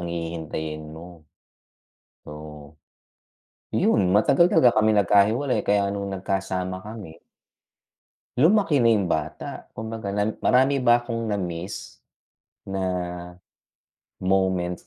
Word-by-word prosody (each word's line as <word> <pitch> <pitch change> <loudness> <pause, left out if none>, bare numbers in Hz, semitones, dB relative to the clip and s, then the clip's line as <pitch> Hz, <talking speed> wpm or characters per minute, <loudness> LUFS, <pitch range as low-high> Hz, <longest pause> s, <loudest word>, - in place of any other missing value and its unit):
ang 85 - -5
hihintayin 80 -2 -5
mo, 85 -2 -13 1.0
oo. 75 0 -11 1.0
Yun 100 -3 +3
matagal 135 +11 +4
talaga 120 -9 +4
kaming 110 -1 +3
nagkahiwalay 110 +8 +2
kaya 100 -1 +2
nung 100 0 -4
nagkasama 95 -1 -3
kami. 100 -5 -10 1.2
Lumaki 160 - +4
na 115 - +4
yung 105 -4 +2
bata, 80 -3 -4
kumbaga 110 -2 -5
na 105 +2 -1
marami 135 +2 +3
ba 120 -1 +5
akong 115 -2 -4
namiss? 90 -3 -5 0.6
Na, 95 0 -4 1.4
moments 95 -2 0
100 Hz, 100 wpm, -24 LUFS, 85-110 Hz, 1.4 s, ba